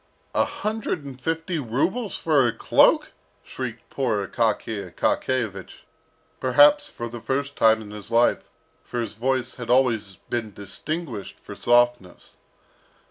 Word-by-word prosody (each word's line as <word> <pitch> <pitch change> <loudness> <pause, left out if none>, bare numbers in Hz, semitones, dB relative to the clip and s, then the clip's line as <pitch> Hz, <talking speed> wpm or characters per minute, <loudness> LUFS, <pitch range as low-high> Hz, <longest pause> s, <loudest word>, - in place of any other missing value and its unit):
"A - - +3
hundred 215 -8 -3
and 130 -2 -9
fifty 165 +3 -2
rubles 175 - -1
for 145 -6 +3
a - - +1
cloak!" 115 - +3 0.3
shrieked 120 -3 -6
poor 115 -7 0
Akaky 110 -2 -1
Akakiyevich, 110 -8 -2 0.6
perhaps 295 - +5
for 120 - -6
the 115 0 -8
first 140 +3 -2
time 110 0 +4
in 105 - -11
his 105 0 -9
life, 120 +1 +2 0.3
for 120 - -5
his 115 -3 -3
voice 130 +3 -1
had 120 -2 -7
always 120 -6 +2
been 110 0 -5
distinguished 110 - -5
for - - -10
softness. 120 -6 +1
120 Hz, 135 wpm, -24 LUFS, 110-140 Hz, 0.6 s, perhaps